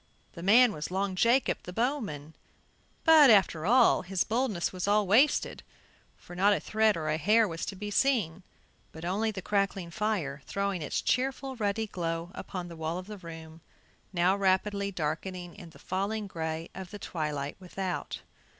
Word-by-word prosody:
The 170 Hz, -, -9 dB
man 225 Hz, +6 st, +6 dB
was 150 Hz, -4 st, -5 dB
Long 190 Hz, +1 st, -1 dB
Jacob, 235 Hz, +8 st, +2 dB
the 180 Hz, -, -8 dB
bowman; 200 Hz, -, -3 dB, 0.7 s
but, 315 Hz, -4 st, +8 dB
after 185 Hz, -6 st, +4 dB
all, 245 Hz, +2 st, +5 dB
his 185 Hz, 0 st, -1 dB
boldness 225 Hz, -7 st, -1 dB
was 185 Hz, +1 st, -3 dB
all 205 Hz, 0 st, +3 dB
wasted, 235 Hz, +10 st, +3 dB, 0.6 s
for 175 Hz, -, -12 dB
not 200 Hz, +3 st, +4 dB
a -, -, 0 dB
thread 215 Hz, -2 st, +2 dB
or 155 Hz, -1 st, -4 dB
a 155 Hz, 0 st, +1 dB
hair 215 Hz, +6 st, +4 dB
was 165 Hz, -2 st, -5 dB
to 195 Hz, -, -5 dB
be 205 Hz, +2 st, -6 dB
seen, 205 Hz, -9 st, +1 dB, 0.5 s
but 160 Hz, +1 st, -9 dB
only 205 Hz, +5 st, 0 dB
the 195 Hz, -4 st, -6 dB
crackling 195 Hz, -4 st, -1 dB
fire 170 Hz, -9 st, -2 dB
throwing 200 Hz, -3 st, -2 dB
its 150 Hz, -, -2 dB
cheerful 265 Hz, +1 st, -1 dB
ruddy 220 Hz, -1 st, -1 dB
glow 170 Hz, -3 st, -4 dB
upon 180 Hz, -3 st, -6 dB
the 170 Hz, -, -9 dB
wall 160 Hz, +1 st, -3 dB
of 185 Hz, -, -6 dB
the 210 Hz, 0 st, -9 dB
room, 165 Hz, -2 st, -10 dB, 0.5 s
now 180 Hz, +1 st, +2 dB
rapidly 200 Hz, +1 st, +1 dB
darkening 175 Hz, +2 st, -4 dB
in 180 Hz, -5 st, -11 dB
the 160 Hz, -, -17 dB
falling 200 Hz, +3 st, -3 dB
gray 160 Hz, -3 st, -5 dB
of 190 Hz, -2 st, -8 dB
the 205 Hz, -, -8 dB
twilight 150 Hz, -6 st, -4 dB
without. 185 Hz, 0 st, -5 dB
190 Hz, 170 wpm, -29 LUFS, 170-210 Hz, 0.7 s, but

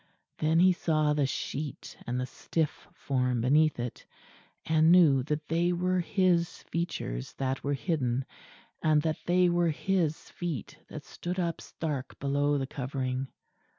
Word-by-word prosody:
Then 160 Hz, +2 st, +3 dB
he 185 Hz, +1 st, +6 dB
saw 155 Hz, -4 st, +1 dB
the 145 Hz, -2 st, +1 dB
sheet 140 Hz, +1 st, -5 dB
and 125 Hz, +1 st, -1 dB
the 125 Hz, -, -1 dB
stiff 155 Hz, +4 st, -3 dB
form 125 Hz, -3 st, -1 dB
beneath 150 Hz, +3 st, +3 dB
it; 120 Hz, -1 st, -5 dB, 0.6 s
and 160 Hz, +1 st, +4 dB
knew 160 Hz, -7 st, +6 dB
that 150 Hz, +3 st, -3 dB
they 170 Hz, +2 st, +2 dB
were 180 Hz, +1 st, +1 dB
his 175 Hz, -2 st, +1 dB
features 165 Hz, -, -4 dB
that 135 Hz, 0 st, -2 dB
were 145 Hz, 0 st, 0 dB
hidden; 135 Hz, -5 st, -1 dB, 0.6 s
and 155 Hz, -1 st, +3 dB
that 160 Hz, -1 st, -1 dB
they 180 Hz, +1 st, +4 dB
were 175 Hz, -1 st, +2 dB
his 160 Hz, 0 st, -1 dB
feet 165 Hz, -, -4 dB
that -, -, -8 dB
stood 180 Hz, +1 st, -5 dB
up 170 Hz, -2 st, -1 dB
stark 145 Hz, -5 st, -5 dB
below 145 Hz, +1 st, +1 dB
the 135 Hz, -, -1 dB
covering. 130 Hz, 0 st, -3 dB
155 Hz, 150 wpm, -29 LUFS, 135-170 Hz, 0.6 s, he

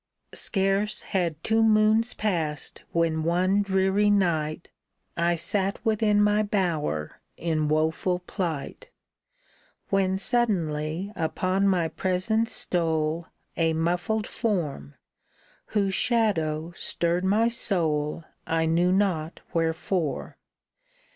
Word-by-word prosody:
Scarce 195 Hz, +1 st, 0 dB
had 170 Hz, -5 st, -2 dB
two 225 Hz, 0 st, +2 dB
moons 220 Hz, +1 st, +4 dB
passed 165 Hz, -8 st, -2 dB
when 165 Hz, -1 st, +1 dB
one 185 Hz, +4 st, +2 dB
dreary 195 Hz, +1 st, +2 dB
night 170 Hz, -6 st, 0 dB, 0.5 s
I 170 Hz, 0 st, +2 dB
sat 195 Hz, +4 st, -1 dB
within 215 Hz, -1 st, +3 dB
my 210 Hz, +1 st, +3 dB
bower 170 Hz, -, -1 dB, 0.2 s
in 155 Hz, -2 st, 0 dB
woeful 160 Hz, +4 st, +1 dB
plight, 180 Hz, -, -5 dB, 1.0 s
When 190 Hz, -1 st, +2 dB
suddenly 185 Hz, -6 st, -1 dB
upon 185 Hz, +4 st, 0 dB
my 180 Hz, -4 st, +2 dB
presence 190 Hz, +7 st, 0 dB
stole 160 Hz, -1 st, -1 dB, 0.3 s
A 165 Hz, -1 st, +2 dB
muffled 175 Hz, +6 st, 0 dB
form, 155 Hz, -, -2 dB, 0.7 s
whose 200 Hz, -2 st, 0 dB
shadow 175 Hz, -10 st, +1 dB
stirred 170 Hz, +1 st, 0 dB
my 210 Hz, +5 st, +3 dB
soul 165 Hz, -9 st, 0 dB, 0.2 s
I 160 Hz, 0 st, +1 dB
knew 170 Hz, +3 st, +2 dB
not 180 Hz, -5 st, 0 dB
wherefore. 165 Hz, 0 st, -1 dB
180 Hz, 100 wpm, -26 LUFS, 160-205 Hz, 1.0 s, moons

